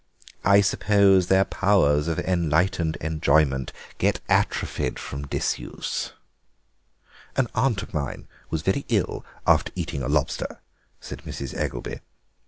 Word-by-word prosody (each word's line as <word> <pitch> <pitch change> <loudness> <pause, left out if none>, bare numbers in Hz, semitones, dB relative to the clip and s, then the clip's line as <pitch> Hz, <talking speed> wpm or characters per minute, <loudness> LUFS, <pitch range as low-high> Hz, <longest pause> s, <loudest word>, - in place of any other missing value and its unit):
I 100 +1 +6
suppose 100 -2 +4
their 95 0 +4
powers 80 -7 +2
of 80 - -1
enlightened 85 -1 +1
enjoyment 75 -4 +2 0.3
get - - +2
atrophied 65 - 0
from 70 +1 -6
disuse." - - -3 1.2
"An 130 - +2
aunt 115 -7 +1
of - - -11
mine 75 -3 -4 0.2
was 80 -1 -2
very 95 - +1
ill 105 -6 0 0.2
after - - +3
eating 85 -5 -3
a 65 - -2
lobster," 70 -3 -1 0.4
said - - -7
Mrs. 70 -2 -6
Eggelby. - - -3
85 Hz, 120 wpm, -25 LUFS, 75-95 Hz, 1.2 s, I